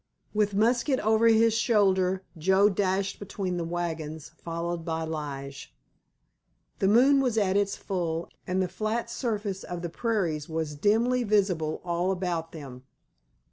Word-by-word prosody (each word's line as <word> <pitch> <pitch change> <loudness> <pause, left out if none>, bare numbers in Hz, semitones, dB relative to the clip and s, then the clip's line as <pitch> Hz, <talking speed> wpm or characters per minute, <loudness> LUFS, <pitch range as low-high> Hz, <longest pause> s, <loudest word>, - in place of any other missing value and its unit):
With 210 -1 +1
musket 240 +5 +2
over 220 +2 +3
his 225 0 +5
shoulder 190 -5 +2
Joe 190 +5 +4
dashed 195 0 -1
between 190 -2 -3
the 170 - -2
wagons, 160 -3 -4
followed 170 0 -3
by 160 -1 -2
Lige. 140 - -6 1.0
The 195 - +2
moon 265 +7 +5
was 245 -4 0
at 195 -3 +2
its 200 0 +1
full, 170 -4 -3 0.2
and 185 +1 +1
the - - -1
flat 225 +4 -3
surface 210 -6 -3
of 175 -1 -6
the 175 - -2
prairies 170 -8 -1
was 160 -2 -2
dimly 225 +10 +2
visible 190 -8 +1
all 175 +2 0
about 175 -3 -2
them. 135 -6 -9
190 Hz, 140 wpm, -27 LUFS, 165-215 Hz, 1.0 s, his